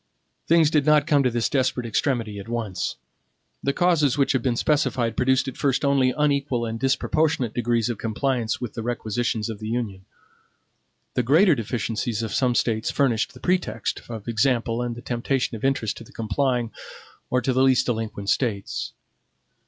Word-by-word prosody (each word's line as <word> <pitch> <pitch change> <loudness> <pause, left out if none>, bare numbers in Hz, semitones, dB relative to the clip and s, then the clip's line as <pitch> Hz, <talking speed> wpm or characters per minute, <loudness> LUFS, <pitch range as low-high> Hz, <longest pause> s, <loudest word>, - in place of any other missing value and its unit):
Things 165 -2 +4
did 150 -3 +3
not 150 -1 +4
come 145 -2 +3
to 130 - +2
this 120 -2 0
desperate 130 -2 0
extremity 115 -3 -1
at 100 - -9
once. 110 -6 -3 0.7
The 140 - +1
causes 155 -5 +2
which 140 - +3
have 130 - +1
been 125 -1 0
specified 130 -4 +1
produced 130 +1 +2
at 135 - -5
first 140 0 +1
only 135 -2 +3
unequal 140 -5 +1
and 115 0 -4
disproportionate 135 -1 +1
degrees 120 -1 +1
of 120 -4 -3
compliance 115 0 -1
with 125 - -5
the 115 - -5
requisitions 115 -1 -2
of 110 -3 -6
the 110 - -6
Union. 110 -5 -3 1.1
The - - +1
greater 160 - +5
deficiencies 115 -1 -2
of 110 -2 -4
some 125 0 +2
States 110 -2 +1
furnished 120 -5 +1
the - - -12
pretext 180 +5 -1
of 110 -2 -7
example 115 0 +1
and 120 -1 -3
the 120 - -10
temptation 125 +1 -1
of 110 - -9
interest 135 -5 0
to - - -9
the - - -17
complying, 120 +2 -1 0.6
or 125 - +2
to 130 +1 0
the 130 - +2
least 130 -1 +4
delinquent 110 -4 -2
States. 105 -7 -2
120 Hz, 175 wpm, -24 LUFS, 115-135 Hz, 1.1 s, greater